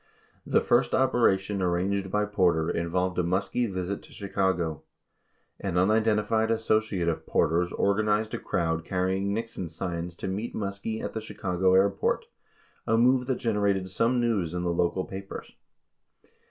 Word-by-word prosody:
36 -, -, -11 dB
The -, -, +6 dB
first -, -, +2 dB
operation 105 Hz, -7 st, +2 dB
arranged 95 Hz, +2 st, 0 dB
by 105 Hz, +2 st, +1 dB
Porter 90 Hz, -6 st, +2 dB
involved 90 Hz, +2 st, -1 dB
a -, -, +2 dB
MuSkie 100 Hz, +6 st, 0 dB
visit 95 Hz, +1 st, -3 dB
to -, -, -17 dB
Chicago. 95 Hz, -6 st, -1 dB, 0.8 s
An 95 Hz, -3 st, -2 dB
unidentified 110 Hz, +3 st, +2 dB
associate 110 Hz, -5 st, +1 dB
of 85 Hz, -, -2 dB
Porter's 85 Hz, +3 st, +1 dB
organized 105 Hz, +2 st, +1 dB
a -, -, -2 dB
crowd 80 Hz, -1 st, -1 dB
carry 95 Hz, +2 st, 0 dB
ing 100 Hz, +1 st, -1 dB
Nixon 110 Hz, -5 st, -4 dB
signs 85 Hz, 0 st, -4 dB
to -, -, -5 dB
meet 100 Hz, +5 st, -3 dB
Muskie 100 Hz, +2 st, -4 dB
at -, -, -4 dB
the 110 Hz, -, -3 dB
Chicago 95 Hz, -3 st, 0 dB
airport, 100 Hz, +1 st, +2 dB, 0.6 s
a 115 Hz, -, +3 dB
move 125 Hz, +1 st, +3 dB
that 130 Hz, -, +1 dB
generated 100 Hz, -5 st, 0 dB
some 115 Hz, +7 st, +1 dB
news 100 Hz, -8 st, 0 dB
in 90 Hz, -, -2 dB
the 85 Hz, -1 st, 0 dB
local 85 Hz, +2 st, 0 dB
papers. 95 Hz, 0 st, -8 dB
95 Hz, 155 wpm, -27 LUFS, 90-110 Hz, 0.8 s, The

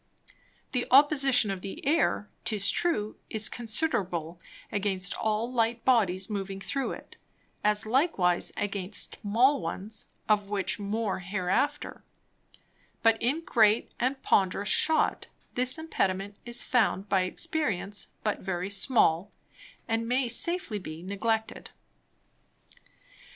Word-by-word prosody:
The 250 Hz, -2 st, -1 dB
Opposition 270 Hz, -5 st, +5 dB
of 190 Hz, -2 st, -5 dB
the 195 Hz, +5 st, -8 dB
Air, 290 Hz, -8 st, +1 dB, 0.2 s
'tis 200 Hz, -2 st, +2 dB
true, 215 Hz, -12 st, -1 dB
is 215 Hz, -1 st, +2 dB
considerable 190 Hz, -, -1 dB, 0.3 s
against 195 Hz, -2 st, -1 dB
all 220 Hz, +3 st, -1 dB
light 230 Hz, -1 st, 0 dB
Bodies 195 Hz, -7 st, +2 dB
moving 195 Hz, -2 st, -4 dB
through 275 Hz, +6 st, -3 dB
it, -, -, -12 dB, 0.5 s
as 210 Hz, +1 st, +2 dB
likewise 220 Hz, -, +1 dB
against 200 Hz, -1 st, -3 dB
small 240 Hz, +7 st, +3 dB
ones 200 Hz, +6 st, -4 dB, 0.2 s
(of 205 Hz, -2 st, +2 dB
which 200 Hz, -1 st, -2 dB
more 205 Hz, 0 st, -2 dB
hereafter) 190 Hz, +10 st, -2 dB, 1.0 s
but 225 Hz, -1 st, +3 dB
in 275 Hz, +7 st, 0 dB
great 220 Hz, -4 st, +3 dB
and 260 Hz, +2 st, 0 dB
ponderous 195 Hz, +1 st, +2 dB
Shot, 315 Hz, -1 st, +2 dB, 0.3 s
this 250 Hz, +3 st, +3 dB
Impediment 200 Hz, -11 st, -2 dB
is 240 Hz, 0 st, +3 dB
found 220 Hz, -5 st, +1 dB
by 195 Hz, -1 st, +2 dB
Experience 200 Hz, -, -1 dB, 0.2 s
but 210 Hz, -1 st, -1 dB
very 185 Hz, 0 st, -4 dB
small, 200 Hz, -4 st, +3 dB, 0.6 s
and 225 Hz, -1 st, -1 dB
may 250 Hz, +1 st, +1 dB
safely 240 Hz, -, +1 dB
be 160 Hz, -2 st, -9 dB
neglected. 220 Hz, +3 st, -2 dB
210 Hz, 115 wpm, -28 LUFS, 195-245 Hz, 1.0 s, Opposition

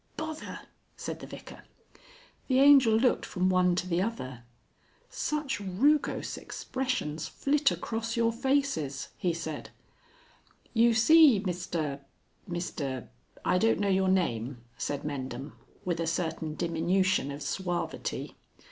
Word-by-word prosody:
"Bother!" 315 Hz, 0 st, -5 dB, 0.4 s
said -, -, -5 dB
the -, -, -9 dB
Vicar. -, -, -10 dB, 0.9 s
The 260 Hz, -1 st, +3 dB
Angel 275 Hz, -4 st, +7 dB
looked 250 Hz, +2 st, +2 dB
from 185 Hz, -1 st, 0 dB
one 180 Hz, -1 st, +3 dB
to 180 Hz, 0 st, -2 dB
the 175 Hz, 0 st, +1 dB
other. 130 Hz, -, -4 dB, 0.7 s
"Such 300 Hz, -5 st, -2 dB
rugose 235 Hz, +11 st, +1 dB
expressions 255 Hz, -, -3 dB
flit 280 Hz, 0 st, +2 dB
across 230 Hz, +1 st, -3 dB
your 230 Hz, 0 st, +3 dB
faces!" 235 Hz, -, 0 dB
he 180 Hz, -, 0 dB
said. 160 Hz, -2 st, -5 dB, 1.0 s
"You 230 Hz, 0 st, +4 dB
see, 280 Hz, 0 st, +7 dB
Mr 175 Hz, -6 st, -3 dB, 0.5 s
Mr 140 Hz, -, -4 dB, 0.4 s
I 180 Hz, -, +3 dB
don't 225 Hz, +2 st, +3 dB
know 200 Hz, -1 st, +1 dB
your 190 Hz, 0 st, +3 dB
name," 125 Hz, -9 st, 0 dB
said 140 Hz, +4 st, -3 dB
Mendham, 135 Hz, -1 st, -5 dB, 0.3 s
with 175 Hz, -2 st, -1 dB
a 165 Hz, -, -1 dB
certain 160 Hz, -2 st, -2 dB
diminution 175 Hz, 0 st, +1 dB
of 145 Hz, +1 st, -6 dB
suavity. 180 Hz, -2 st, -3 dB
185 Hz, 120 wpm, -29 LUFS, 155-235 Hz, 1.0 s, Angel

